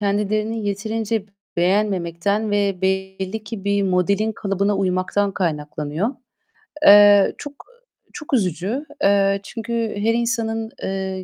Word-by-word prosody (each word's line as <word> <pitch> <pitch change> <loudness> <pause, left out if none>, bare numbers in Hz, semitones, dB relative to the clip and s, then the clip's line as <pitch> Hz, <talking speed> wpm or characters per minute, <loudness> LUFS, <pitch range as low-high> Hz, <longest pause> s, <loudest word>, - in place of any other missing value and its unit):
kendilerini 210 +2 -1
yeterince 220 +1 -2 0.3
beğenmemekten 195 +2 0
ve 200 -2 0
belli 190 +2 -2
ki 205 -2 -7
bir 200 0 +1
modelin 195 +3 +1
kalıbına 200 -1 -1
uymaktan 195 +1 0
kaynaklanıyor. 155 +1 -2 0.8
Eee, 205 -1 +8
çok 290 0 -8 0.2
eee, - - -32
çok 295 - -8
üzücü. 200 - -1 0.2
Eee, 195 0 +3
çünkü 225 +3 -6 0.2
her 220 +3 +1
insanın, 230 -2 -1
eee, 190 -1 -3
200 Hz, 110 wpm, -21 LUFS, 190-220 Hz, 0.8 s, Eee